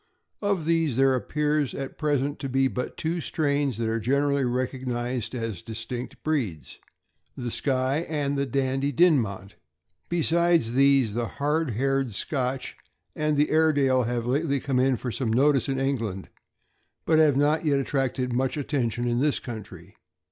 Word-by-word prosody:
Of 200 -6 0
these, 165 -6 +1
there 135 0 +4
appears 150 +2 0
at 135 -1 -6
present 145 -2 0
to 135 - -4
be 135 +1 +2
but 125 -1 -4
two 165 +2 -2
strains 145 -5 0
that 115 -1 -1
are 115 +1 0
generally 140 +4 +1
recog 130 +1 -2
nized 120 0 -2
as 115 -4 -4
distinct 115 +2 -7
breeds 120 - -2 0.3
— - - -44
the 120 -2 -4
Skye 130 +1 0
and 145 -2 -1
the 140 0 -1
Dandie 135 +1 0
Dinmont. 115 - +2 0.6
Besides 170 -6 +2
these, 135 -4 +4
the 120 +1 -1
hard 150 -1 0
haired 135 -3 0
Scotch 130 +1 -2 0.4
and 150 -1 0
the 150 +1 +2
Airedale 145 -5 +3
have 120 0 -2
lately 140 +3 0
come 135 -1 -1
in 130 -1 +2
for 125 +2 -4
some 120 -1 -2
notice 135 +2 +3
in 135 -1 -1
England, 115 -9 -2 0.8
but 160 -1 +4
have 150 -4 +4
not 150 +3 +2
yet 145 -3 +2
attracted 135 -2 -1
much 130 +4 0
attention 125 -5 -1
in 120 0 +1
this 145 +1 +2
country. 100 -6 -9
135 Hz, 160 wpm, -26 LUFS, 120-145 Hz, 0.8 s, there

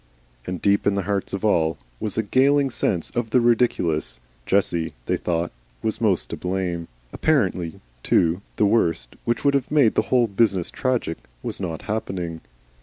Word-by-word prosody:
And 90 -1 -3
deep 100 +3 +2
in 100 - +3
the 100 - 0
hearts 100 +1 -2
of 100 +2 -3
all 80 -6 +2 0.2
was 105 -1 -3
a 110 - +2
galling 135 +5 +3
sense 90 -7 -1
of 120 -2 -2
the 125 - +4
ridiculous. 115 - +1 0.3
Jessie, 85 -4 +1
they - - +1
thought, 85 0 -1 0.3
was - - -1
most - - +1
to - - -2
blame. 90 -2 -2 0.3
Apparently, 85 -3 +1 0.2
too, 85 +7 +2
the 105 - +3
worst, 85 - +1
which 120 - -1
would 140 - +5
have 140 -2 0
made 145 -7 +4
the - - +3
whole 125 -2 +4
business 100 -4 +1
tragic, 125 -10 -1 0.3
was - - -4
not 85 -4 -4
happening. 90 -6 -3
100 Hz, 170 wpm, -23 LUFS, 85-115 Hz, 0.3 s, would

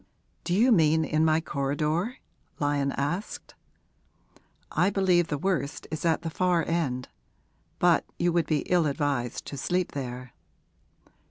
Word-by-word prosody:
'Do 175 - 0
you 240 +6 +4
mean 160 -5 +4
in 155 +1 +1
my 160 0 +3
corridor?' 155 - -1 0.4
Lyon 145 -1 +1
asked. 170 +9 -4 1.2
'I 180 - +2
believe 185 -4 +2
the 145 - -2
worst 155 -3 -2
is 155 - -4
at 165 0 +2
the 165 - -3
far 180 0 +1
end. 135 -7 -1 0.7
But - - +4
you 175 0 +1
would 170 -3 +1
be 155 -2 +1
ill 175 -3 +2
advised 140 -5 -2
to 140 - -7
sleep 180 +6 -1
there.' 125 -2 -6
160 Hz, 140 wpm, -27 LUFS, 140-175 Hz, 1.2 s, you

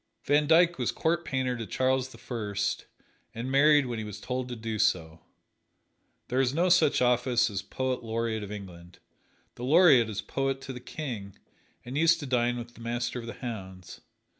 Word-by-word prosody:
Van 145 +1 +2
Dyck 170 +2 +4
was - - 0
court 170 +1 0
painter 130 -4 -1
to 115 -3 -6
Charles 130 +3 0
the - - -13
First, 105 -4 -3 0.5
and 120 +3 -4
married 145 +1 +5
when 120 -2 -4
he - - -4
was 105 -1 -7
told 125 +2 -4
to 120 - -4
do 110 -1 -4
so. 80 -4 0 1.1
There 130 +2 +1
is 130 +1 0
no 175 +3 +2
such 170 -7 +4
office 120 -1 +2
as 95 -2 -3
"Poet 130 +5 -3
Laureate 115 -1 -2
of 105 0 -7
England" 90 -4 -10 0.6
the 120 - -9
Laureate 140 -5 +6
is 105 - -4
poet 135 0 -2
to 135 - -7
the 125 - -7
King, 120 - -6 0.5
and 130 +4 -3
used 165 +1 +4
to - - -5
dine 120 -2 +1
with 120 0 -8
the 115 - -15
Master 120 +1 -2
of 115 - -8
the 115 - -5
Hounds. 95 -6 -7
125 Hz, 190 wpm, -28 LUFS, 110-135 Hz, 1.1 s, Laureate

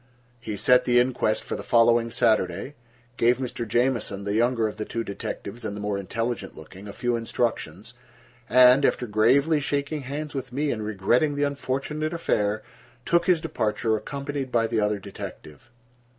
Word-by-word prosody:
He 110 -3 -5
set 125 +4 +4
the 120 0 +3
inquest 120 -3 +1
for - - -4
the - - -5
following 115 0 +3
Saturday, 110 +2 +1 0.4
gave 120 +1 +3
Mr. 125 -2 -4
Jamieson, 120 -3 0
the 100 0 -2
younger 115 0 +2
of 105 - -7
the 110 - -3
two 115 +1 -4
detectives, 100 +2 -6
and 100 - -4
the - - -6
more 105 -1 -2
intelligent 115 +1 -4
looking, 95 +6 -11
a - - -6
few 120 +3 -1
instructions, 115 0 -3 0.6
and, 125 +2 +7
after 125 - +1
gravely 130 +9 +3
shaking 145 +1 -2
hands 145 +3 -5
with 135 -2 -5
me 145 +3 -1
and 110 -2 -3
regretting 110 +8 +1
the 145 - 0
unfortunate 145 +3 -2
affair, 105 -10 0 0.4
took 170 +1 +2
his 175 -3 +4
departure, 115 -7 -1
accompanied 140 +4 -4
by 115 -2 +2
the 115 0 0
other 105 0 +1
detective. 95 - -10
120 Hz, 165 wpm, -25 LUFS, 105-140 Hz, 0.6 s, and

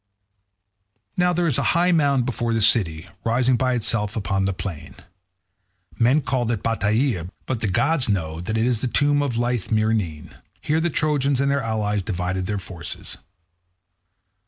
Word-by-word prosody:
Now 180 0 +2
there 175 0 0
is 150 -8 +2
a - - +2
high 175 +1 +4
mound 140 -6 +2
before 120 -2 -1
the 115 - +1
city, 85 -8 +3 0.2
rising 125 +2 +2
by 125 +1 +1
itself 105 -2 +1
upon 95 -2 -1
the 100 - +1
plain. 80 -6 -6 1.0
Men 125 +6 +4
call 125 -3 -1
it 115 - -3
Batieia, 110 - 0 0.2
but 130 -4 -2
the 110 - -1
gods 125 - +1
know 80 -5 -1
that 110 +5 -2
it 110 - +2
is 120 -3 0
the 130 - 0
tomb 145 +3 +2
of 130 -5 -1
lithe 120 -3 -1
Myrine. 110 -9 -1 0.3
Here 155 +2 0
the 170 +1 0
Trojans 145 -4 +1
and 140 0 +2
their 140 0 +1
allies 105 -3 -1
divided 90 -1 -3
their 105 0 -1
forces. 90 -3 -7
115 Hz, 165 wpm, -22 LUFS, 100-135 Hz, 1.0 s, high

